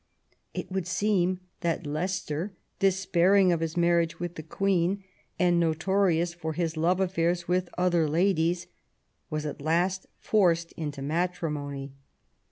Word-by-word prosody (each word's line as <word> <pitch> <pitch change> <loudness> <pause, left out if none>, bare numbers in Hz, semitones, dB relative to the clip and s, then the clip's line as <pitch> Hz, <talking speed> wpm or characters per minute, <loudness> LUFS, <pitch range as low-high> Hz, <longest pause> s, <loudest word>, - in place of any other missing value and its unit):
It - - -5
would 190 -2 -2
seem 185 -1 +1 0.2
that 170 -1 -1
Leicester, 170 +3 -2 0.3
despairing 190 0 +4
of 170 - +1
his 165 +1 -3
marriage 170 -1 +2
with 175 0 -4
the 160 - -7
Queen, 190 +3 0 0.3
and 175 0 +3
notorious 170 +1 +2
for 160 -2 -4
his 165 -1 -1
love 170 +4 +2
affairs 175 -2 0
with 180 0 +1
other 175 -3 +2
ladies, 175 +1 +2 0.6
was 155 0 -3
at 145 - -5
last 175 +5 0
forced 170 -5 +2
into 145 -4 -5
matrimony. 150 -4 -2
175 Hz, 130 wpm, -28 LUFS, 160-185 Hz, 0.6 s, despairing